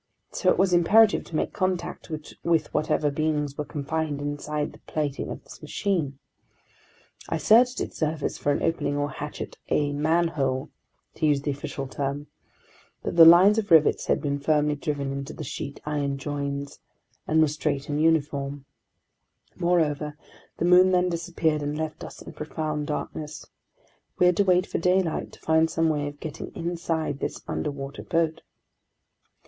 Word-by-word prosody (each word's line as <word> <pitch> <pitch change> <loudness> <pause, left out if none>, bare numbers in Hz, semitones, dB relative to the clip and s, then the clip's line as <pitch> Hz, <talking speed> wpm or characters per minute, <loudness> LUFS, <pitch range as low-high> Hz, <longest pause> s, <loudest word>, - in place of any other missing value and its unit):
So 185 - +1
it - - +3
was 185 0 +3
imperative 210 +5 +5
to 160 - -8
make - - -1
contact 180 -2 -2 0.3
with 165 -3 +1
whatever 150 -1 +1
beings 150 -1 -1
were 150 - -3
confined 150 0 -3
inside 145 +1 -3
the - - -15
plating 145 -3 -2
of - - -7
this - - -13
machine. 165 -10 -1 1.1
I 165 - 0
searched 240 +10 +4
its - - -5
surface 155 -2 -1
for 145 - 0
an 145 - -1
opening 145 -3 0
or 145 0 0
a - - -10
hatch, 150 +1 -5 0.3
a 145 -1 +1
"manhole," 150 -3 0 0.4
to 155 - 0
use 145 -2 +2
the 145 - 0
official 140 -1 -5
term; 140 +2 -3 0.8
but - - -3
the 165 -1 +10
lines 185 +6 +8
of 210 - -4
rivets 160 -3 +5
had - - +1
been 140 -1 -1
firmly 150 0 +2
driven 145 -2 -3
into 140 +1 -5
the 160 - -7
sheet 140 -1 -6
iron 145 -2 -1
joins 140 0 -4 0.5
and 160 +1 +3
were 155 - +5
straight 145 -1 -2
and 145 0 -1
uniform. 145 -3 0 0.9
Moreover, 155 -4 0 0.4
the - - 0
moon 180 +1 +7
then 180 0 +3
disappeared 165 -2 -1
and 145 +1 -3
left 155 0 -4
us - - -9
in - - -10
profound 150 -1 -3
darkness. 150 0 -5 0.7
We 180 - +4
had 180 -1 +4
to 200 - +5
wait 180 -1 +4
for - - -3
daylight 180 -1 +1
to - - -14
find 160 0 +3
some 165 0 +1
way 145 -2 0
of 145 0 -8
getting 155 -3 -7
inside 165 -4 -2
this - - -4
underwater 140 -1 -4
boat. 165 -1 0
155 Hz, 165 wpm, -26 LUFS, 145-165 Hz, 1.1 s, the